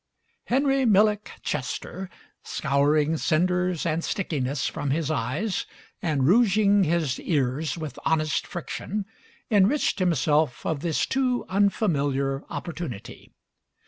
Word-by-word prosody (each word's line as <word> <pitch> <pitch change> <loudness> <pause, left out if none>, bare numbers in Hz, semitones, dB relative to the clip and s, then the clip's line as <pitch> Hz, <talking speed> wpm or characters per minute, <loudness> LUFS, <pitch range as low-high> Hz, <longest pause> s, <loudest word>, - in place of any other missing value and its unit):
Henry 270 +1 +2
Millick 210 -2 +3 0.2
Chester, 175 +6 -4 0.3
scouring 145 +3 +1
cinders 180 +2 +1
and 165 0 0
stickiness 140 -8 -2
from 145 - -3
his 155 +2 0
eyes 155 - -2 0.3
and 150 -8 +1
rouging 205 -1 +4
his 155 -5 0
ears 145 +1 -1
with 155 -5 -6
honest 155 -2 0
friction, 195 +3 -4 0.5
enriched 210 +4 +3
himself 155 -5 +1
of 160 -3 -1
this 165 0 0
too 255 -2 0
unfamiliar 145 -9 +1
opportunity. 155 - -7
165 Hz, 105 wpm, -25 LUFS, 145-200 Hz, 0.5 s, rouging